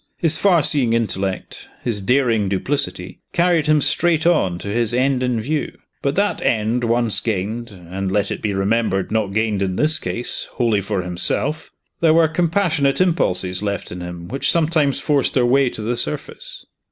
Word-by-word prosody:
His 165 Hz, -3 st, +2 dB
far 180 Hz, -6 st, +3 dB
seeing 125 Hz, -6 st, +3 dB
intellect, 95 Hz, -4 st, -2 dB, 0.2 s
his 110 Hz, -4 st, -1 dB
daring 115 Hz, -3 st, +1 dB
duplicity, 95 Hz, -2 st, -2 dB
carried 170 Hz, -3 st, +2 dB
him 155 Hz, -1 st, +3 dB
straight 165 Hz, +2 st, +2 dB
on 125 Hz, -, +2 dB
to 95 Hz, -, -8 dB
his 115 Hz, +2 st, 0 dB
end 130 Hz, 0 st, +1 dB
in 125 Hz, -2 st, 0 dB
view. 145 Hz, +7 st, -3 dB, 0.2 s
But, 140 Hz, +1 st, -1 dB
that 205 Hz, +1 st, 0 dB
end 115 Hz, +2 st, 0 dB
once 115 Hz, -2 st, +2 dB
gained 110 Hz, +2 st, -3 dB
and, 95 Hz, 0 st, -6 dB
let 100 Hz, 0 st, 0 dB
it -, -, -4 dB
be 105 Hz, -, -1 dB
remembered, 95 Hz, -1 st, 0 dB
not 110 Hz, -2 st, +1 dB
gained, 110 Hz, -1 st, 0 dB
in 95 Hz, -1 st, -1 dB
this 155 Hz, +7 st, +4 dB
case, 95 Hz, +7 st, -3 dB
wholly 115 Hz, -5 st, +1 dB
for 100 Hz, -1 st, -2 dB
himself 110 Hz, -, -2 dB, 0.3 s
there 160 Hz, -1 st, +4 dB
were 165 Hz, -1 st, +5 dB
compassionate 160 Hz, -3 st, +1 dB
impulses 95 Hz, -, +1 dB
left 100 Hz, -1 st, -3 dB
in 90 Hz, 0 st, -7 dB
him 90 Hz, -1 st, -7 dB
which 135 Hz, +6 st, 0 dB
sometimes 155 Hz, -4 st, +1 dB
forced 145 Hz, -3 st, 0 dB
their 125 Hz, -2 st, +3 dB
way 130 Hz, +1 st, +3 dB
to 110 Hz, -, -7 dB
the 120 Hz, +3 st, -1 dB
surface. -, -, -5 dB
120 Hz, 175 wpm, -20 LUFS, 100-150 Hz, 0.3 s, were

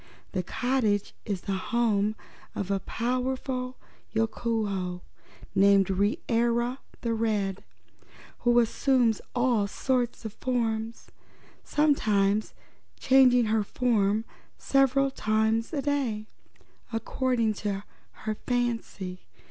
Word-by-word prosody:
The 185 Hz, -, -1 dB
cottage 220 Hz, 0 st, 0 dB
is 200 Hz, -5 st, -2 dB
the -, -, -4 dB, 0.2 s
home 215 Hz, -3 st, +2 dB, 0.4 s
of 200 Hz, -1 st, -3 dB
a 195 Hz, -, +1 dB
powerful 255 Hz, +2 st, -2 dB, 0.4 s
Yookoohoo, 215 Hz, -5 st, -1 dB, 0.5 s
named 195 Hz, -1 st, +5 dB
Reera 235 Hz, +5 st, +1 dB, 0.2 s
the 230 Hz, -1 st, 0 dB
Red, 210 Hz, -4 st, -1 dB, 0.8 s
who 240 Hz, 0 st, +3 dB
assumes 240 Hz, -1 st, +3 dB
all 240 Hz, -4 st, +2 dB
sorts 245 Hz, +1 st, -1 dB
of 215 Hz, -, -5 dB
forms, 230 Hz, -3 st, -2 dB, 0.5 s
sometimes 215 Hz, -9 st, +2 dB, 0.4 s
changing 255 Hz, -2 st, +5 dB
her 220 Hz, 0 st, +2 dB
form 215 Hz, -2 st, +1 dB, 0.3 s
several 275 Hz, 0 st, +3 dB
times 220 Hz, -1 st, +1 dB
in 310 Hz, -, -3 dB
a -, -, +1 dB
day, 255 Hz, -7 st, -1 dB, 0.6 s
according 230 Hz, 0 st, 0 dB
to 200 Hz, -1 st, -2 dB, 0.4 s
her 215 Hz, -, -1 dB
fancy. 230 Hz, -, -2 dB
225 Hz, 100 wpm, -28 LUFS, 205-250 Hz, 0.8 s, named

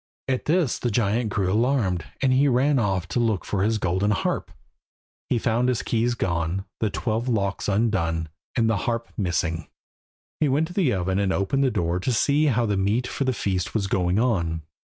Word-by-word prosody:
At 130 Hz, -1 st, -1 dB
this 160 Hz, -4 st, +1 dB
the 120 Hz, -, -1 dB
giant 110 Hz, +1 st, +1 dB
grew 95 Hz, -2 st, 0 dB
alarmed, 110 Hz, -, +1 dB, 0.2 s
and 130 Hz, -1 st, +4 dB
he 135 Hz, +3 st, +4 dB
ran 135 Hz, +2 st, +3 dB
off 95 Hz, -5 st, 0 dB
to 100 Hz, -, 0 dB
look 110 Hz, -5 st, +1 dB
after 100 Hz, -, -1 dB
his 110 Hz, +2 st, +2 dB
golden 95 Hz, +1 st, 0 dB
harp. 100 Hz, -, -1 dB, 0.8 s
He 125 Hz, -, +2 dB
found 120 Hz, +2 st, +1 dB
his 125 Hz, -3 st, 0 dB
keys 120 Hz, +1 st, 0 dB
gone, 85 Hz, -1 st, -1 dB
the 110 Hz, -, +1 dB
twelve 115 Hz, +3 st, -2 dB
locks 100 Hz, -4 st, -1 dB
undone, 95 Hz, -7 st, 0 dB, 0.3 s
and 115 Hz, -2 st, +2 dB
the 115 Hz, -2 st, +2 dB
harp 115 Hz, 0 st, -2 dB
missing. 85 Hz, -4 st, -1 dB, 0.7 s
He 150 Hz, -, +2 dB
went 145 Hz, +4 st, +2 dB
to -, -, -8 dB
the 175 Hz, -9 st, +2 dB
oven 95 Hz, -1 st, 0 dB
and 100 Hz, -1 st, +1 dB
opened 100 Hz, +9 st, +1 dB
the 135 Hz, -, +3 dB
door 85 Hz, -5 st, -1 dB
to 125 Hz, -, -1 dB
see 140 Hz, +6 st, +2 dB
how 120 Hz, -3 st, +2 dB
the 105 Hz, -2 st, 0 dB
meat 105 Hz, +6 st, +1 dB
for 135 Hz, -, -2 dB
the 130 Hz, -, +2 dB
feast 95 Hz, -4 st, -2 dB
was 105 Hz, -3 st, +1 dB
going 90 Hz, -1 st, +1 dB
on. 85 Hz, -9 st, 0 dB
110 Hz, 200 wpm, -24 LUFS, 95-125 Hz, 0.8 s, and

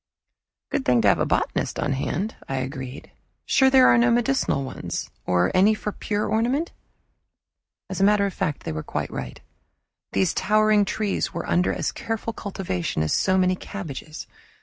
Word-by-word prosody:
"Good -, -, 0 dB
thing 125 Hz, -3 st, +3 dB
to -, -, +4 dB
have 95 Hz, -, +3 dB
a -, -, +1 dB
botanist -, -, -1 dB
on 140 Hz, -, 0 dB
hand," 185 Hz, +10 st, -2 dB
I 135 Hz, -, -1 dB
agreed. 130 Hz, 0 st, -5 dB, 0.3 s
"Sure 265 Hz, -2 st, +4 dB
there 260 Hz, -1 st, +6 dB
are 235 Hz, -, +6 dB
no 240 Hz, +1 st, +4 dB
medicinal 240 Hz, -, +1 dB
ones? 130 Hz, -, -5 dB, 0.2 s
Or 90 Hz, 0 st, +2 dB
any 200 Hz, +4 st, +5 dB
for 210 Hz, -, -4 dB
pure 205 Hz, +1 st, -2 dB
ornament?" 245 Hz, +9 st, 0 dB, 1.2 s
As 190 Hz, 0 st, -4 dB
a -, -, +4 dB
matter 205 Hz, 0 st, +4 dB
of 195 Hz, -, -3 dB
fact 150 Hz, -3 st, -2 dB
they -, -, -4 dB
were 80 Hz, 0 st, -3 dB
quite -, -, -4 dB
right. 65 Hz, -1 st, -6 dB, 0.7 s
These 95 Hz, -1 st, +2 dB
towering 215 Hz, 0 st, +3 dB
trees 205 Hz, 0 st, -2 dB
were 170 Hz, -, -4 dB
under 180 Hz, +1 st, +2 dB
as -, -, -2 dB
careful 225 Hz, 0 st, -4 dB
cultivation 170 Hz, -, -3 dB
as 80 Hz, -, 0 dB
so 185 Hz, -1 st, +2 dB
many 185 Hz, 0 st, +3 dB
cabbages. 160 Hz, -6 st, -7 dB
190 Hz, 170 wpm, -24 LUFS, 135-215 Hz, 1.2 s, there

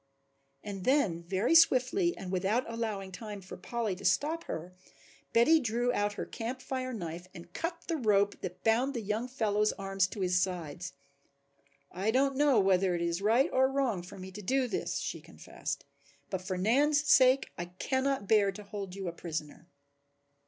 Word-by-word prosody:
And 195 Hz, -2 st, -6 dB
then 240 Hz, -, +2 dB
very 190 Hz, -, 0 dB
swiftly 330 Hz, +3 st, +4 dB
and 185 Hz, -1 st, -6 dB
without 195 Hz, +7 st, +1 dB
allowing 220 Hz, -4 st, -4 dB
time 205 Hz, +2 st, -7 dB
for 190 Hz, -1 st, -10 dB
Polly 225 Hz, +2 st, -3 dB
to -, -, -12 dB
stop 295 Hz, -, +1 dB
her, 175 Hz, +3 st, -6 dB, 0.6 s
Betty 310 Hz, +8 st, +5 dB
drew 240 Hz, -1 st, 0 dB
out 205 Hz, -2 st, 0 dB
her -, -, -4 dB
Camp 240 Hz, +3 st, -5 dB
Fire 255 Hz, 0 st, -4 dB
knife 175 Hz, -5 st, -6 dB
and 170 Hz, +1 st, -11 dB
cut 335 Hz, +1 st, -4 dB
the 330 Hz, -, 0 dB
rope 205 Hz, -5 st, +2 dB
that 180 Hz, 0 st, -7 dB
bound 245 Hz, +5 st, +2 dB
the 235 Hz, -, -2 dB
young 215 Hz, +4 st, -2 dB
fellow's 215 Hz, -4 st, +1 dB
arms 195 Hz, -1 st, 0 dB
to 200 Hz, +1 st, -7 dB
his 180 Hz, 0 st, +2 dB
sides. 175 Hz, -2 st, -3 dB, 1.0 s
"I 195 Hz, +4 st, -1 dB
don't 270 Hz, +3 st, +2 dB
know 280 Hz, -4 st, +4 dB
whether 190 Hz, -2 st, +3 dB
it 170 Hz, -, -2 dB
is 170 Hz, +2 st, -1 dB
right 230 Hz, +6 st, +3 dB
or 260 Hz, 0 st, +4 dB
wrong 260 Hz, -9 st, 0 dB
for 180 Hz, +3 st, -11 dB
me 190 Hz, 0 st, -8 dB
to 205 Hz, +3 st, -8 dB
do 260 Hz, +6 st, +1 dB
this," -, -, -2 dB
she -, -, -4 dB
confessed, -, -, -6 dB, 0.5 s
"but 190 Hz, -2 st, -2 dB
for 185 Hz, 0 st, -3 dB
Nan's 285 Hz, +10 st, +3 dB
sake 260 Hz, 0 st, +5 dB
I 175 Hz, -, -4 dB
cannot 260 Hz, +6 st, -1 dB
bear 205 Hz, -2 st, +4 dB
to 210 Hz, +2 st, -9 dB
hold 200 Hz, -2 st, -6 dB
you 195 Hz, -2 st, -5 dB
a -, -, -1 dB
prisoner." 160 Hz, -2 st, -6 dB
210 Hz, 180 wpm, -31 LUFS, 185-255 Hz, 1.0 s, Betty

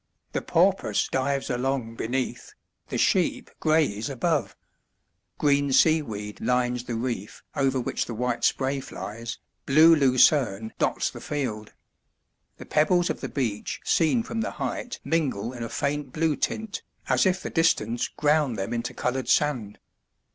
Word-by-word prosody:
The -, -, -2 dB
porpoise -, -, +2 dB
dives 135 Hz, +1 st, 0 dB
along 125 Hz, -2 st, -1 dB
beneath, 125 Hz, +3 st, -3 dB, 0.3 s
the -, -, -3 dB
sheep -, -, +1 dB
graze 150 Hz, -8 st, +1 dB
above. 150 Hz, +3 st, -1 dB, 0.8 s
Green 140 Hz, -1 st, +2 dB
seaweed 115 Hz, -10 st, +2 dB
lines 125 Hz, -1 st, 0 dB
the 120 Hz, -, -3 dB
reef 115 Hz, -4 st, -4 dB
over 135 Hz, -1 st, +1 dB
which 120 Hz, -, -2 dB
the 115 Hz, -, -5 dB
white 120 Hz, 0 st, -2 dB
spray 135 Hz, +1 st, +1 dB
flies, 115 Hz, +1 st, -7 dB, 0.3 s
blue 160 Hz, +4 st, +7 dB
lucerne 130 Hz, -6 st, +3 dB
dots -, -, +1 dB
the -, -, -10 dB
field. 115 Hz, -8 st, -4 dB, 0.8 s
The -, -, -10 dB
pebbles 175 Hz, +3 st, +2 dB
of -, -, -6 dB
the -, -, -4 dB
beach 115 Hz, -7 st, -2 dB
seen 170 Hz, +9 st, +2 dB
from 225 Hz, 0 st, -3 dB
the -, -, -1 dB
height 245 Hz, -, -4 dB
mingle 130 Hz, -8 st, -1 dB
in 120 Hz, -, -8 dB
a 115 Hz, -, -4 dB
faint 145 Hz, -1 st, -2 dB
blue 160 Hz, 0 st, +1 dB
tint, 215 Hz, +9 st, -3 dB, 0.3 s
as -, -, +3 dB
if 185 Hz, 0 st, 0 dB
the -, -, -4 dB
distance 120 Hz, -8 st, +1 dB
ground 150 Hz, -5 st, +1 dB
them 100 Hz, +4 st, -3 dB
into 120 Hz, 0 st, -3 dB
coloured 130 Hz, +1 st, -2 dB
sand. 125 Hz, -9 st, +1 dB
130 Hz, 145 wpm, -26 LUFS, 115-150 Hz, 0.8 s, blue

